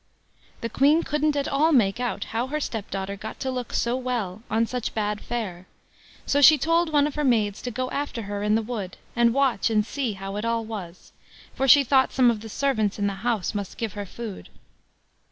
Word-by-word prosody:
The 230 Hz, -, -1 dB
Queen 295 Hz, +7 st, +3 dB
couldn't 300 Hz, 0 st, 0 dB
at 280 Hz, -1 st, 0 dB
all 305 Hz, +4 st, +2 dB
make 225 Hz, -7 st, +3 dB
out 245 Hz, -1 st, -2 dB
how 235 Hz, +3 st, 0 dB
her 300 Hz, +3 st, -2 dB
stepdaughter 200 Hz, -6 st, -4 dB
got 215 Hz, +2 st, -8 dB
to 265 Hz, -, -1 dB
look 250 Hz, -2 st, -4 dB
so 235 Hz, +1 st, 0 dB
well 235 Hz, -7 st, -3 dB
on 225 Hz, +2 st, +2 dB
such 250 Hz, 0 st, -4 dB
bad 210 Hz, -1 st, -1 dB
fare, 190 Hz, -7 st, -5 dB, 0.6 s
so 285 Hz, -, +2 dB
she 310 Hz, +2 st, +9 dB
told 330 Hz, +3 st, +1 dB
one 290 Hz, -1 st, +4 dB
of 300 Hz, -, -2 dB
her 300 Hz, -, -2 dB
maids 215 Hz, -6 st, +1 dB
to 250 Hz, -, -4 dB
go 255 Hz, +2 st, -3 dB
after 280 Hz, -5 st, -3 dB
her 205 Hz, 0 st, -4 dB
in 210 Hz, +1 st, +2 dB
the 225 Hz, -, +1 dB
wood, 210 Hz, -5 st, -5 dB, 0.2 s
and 235 Hz, -1 st, +4 dB
watch 260 Hz, -5 st, +2 dB
and 215 Hz, -2 st, +2 dB
see 250 Hz, -2 st, -2 dB
how 195 Hz, +1 st, -6 dB
it 210 Hz, -, -3 dB
all 230 Hz, -1 st, -1 dB
was, 190 Hz, -6 st, -8 dB, 0.4 s
for 270 Hz, -, 0 dB
she 280 Hz, +2 st, +8 dB
thought 265 Hz, 0 st, +3 dB
some 250 Hz, -2 st, +5 dB
of 220 Hz, -3 st, -4 dB
the 225 Hz, -, -8 dB
servants 220 Hz, -5 st, 0 dB
in 205 Hz, -, -1 dB
the 200 Hz, -, 0 dB
house 230 Hz, -5 st, -1 dB
must 200 Hz, -2 st, -5 dB
give 225 Hz, -4 st, -3 dB
her 205 Hz, -1 st, -6 dB
food. 220 Hz, -1 st, -8 dB
230 Hz, 215 wpm, -25 LUFS, 210-270 Hz, 0.6 s, she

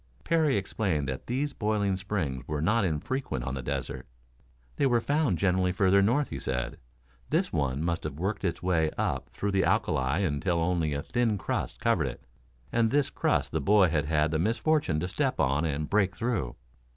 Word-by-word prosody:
Parry 160 Hz, -7 st, +2 dB
explained 95 Hz, -7 st, -1 dB
that 65 Hz, 0 st, -5 dB
these 140 Hz, +4 st, -1 dB
boiling 105 Hz, -3 st, 0 dB
springs 95 Hz, -9 st, -3 dB
were 75 Hz, -1 st, -2 dB
not 105 Hz, +8 st, +2 dB
infrequent 85 Hz, -, -2 dB
on 65 Hz, +2 st, -3 dB
the 65 Hz, -, -3 dB
desert. 60 Hz, -, -4 dB, 0.7 s
They 140 Hz, -, +3 dB
were 120 Hz, -2 st, +3 dB
found, 145 Hz, -, +1 dB
generally, 90 Hz, -1 st, +2 dB
further 95 Hz, +1 st, +4 dB
north, 125 Hz, +9 st, +2 dB
he -, -, -5 dB
said. 60 Hz, -2 st, -3 dB, 0.5 s
This -, -, 0 dB
one 70 Hz, +1 st, 0 dB
must 85 Hz, 0 st, -1 dB
have 75 Hz, -2 st, -4 dB
worked 95 Hz, +6 st, -2 dB
its 90 Hz, -2 st, -2 dB
way 85 Hz, -4 st, +2 dB
up -, -, -1 dB
through 100 Hz, -, -3 dB
the 95 Hz, -1 st, +2 dB
alkali 65 Hz, +4 st, +1 dB
until 85 Hz, +3 st, 0 dB
only 85 Hz, -3 st, 0 dB
a 70 Hz, -, -3 dB
thin 115 Hz, +2 st, 0 dB
crust -, -, -3 dB
covered -, -, +2 dB
it, -, -, -8 dB, 0.5 s
and 115 Hz, -1 st, +2 dB
this 145 Hz, +2 st, +1 dB
crust -, -, 0 dB
the -, -, -1 dB
boy 100 Hz, -3 st, +5 dB
had 75 Hz, -1 st, 0 dB
had 75 Hz, 0 st, +1 dB
the 80 Hz, -, 0 dB
misfortune 115 Hz, -, +1 dB
to 90 Hz, -, -1 dB
step 135 Hz, +7 st, -1 dB
on 70 Hz, +2 st, +2 dB
and 75 Hz, -1 st, -2 dB
break 100 Hz, -3 st, +1 dB
through. 115 Hz, -, -2 dB
95 Hz, 190 wpm, -28 LUFS, 75-110 Hz, 0.7 s, boy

